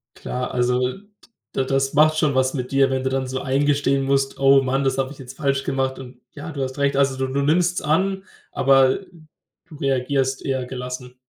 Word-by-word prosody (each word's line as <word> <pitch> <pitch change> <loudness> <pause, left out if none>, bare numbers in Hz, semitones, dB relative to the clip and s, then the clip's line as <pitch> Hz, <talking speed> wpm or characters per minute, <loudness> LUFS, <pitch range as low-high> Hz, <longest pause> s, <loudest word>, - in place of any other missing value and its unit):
Klar, 125 0 -4
also 125 +1 +1 0.6
d 135 - 0
das 135 0 0
macht 155 +1 +4
schon 150 -3 +1
was 130 0 +2
mit 125 -3 -4
dir, 135 -1 +3
wenn 130 0 -1
du 130 - 0
dann 130 0 -2
so 130 +1 -4
eingestehen 140 0 +1
musst: 135 0 0
„Oh 135 0 +6
Mann, 135 +1 0
das 135 - 0
habe 135 0 -1
ich 145 - -11
jetzt 130 0 -11
falsch 140 -2 0
gemacht 135 -1 -2
und, 125 -1 -11
ja, 150 +3 -8
du 140 -3 -5
hast 130 +1 -5
recht.“ 140 -1 +1
Also, 135 -1 +2
du 130 0 -1
du 140 +1 0
nimmst's 170 +5 +2
an, 190 +5 0 0.3
aber 135 -1 +4 0.7
du 155 - -13
reagierst 135 -1 -1
eher 130 -2 -1
gelassen. 125 0 -7
135 Hz, 200 wpm, -22 LUFS, 130-140 Hz, 0.7 s, Oh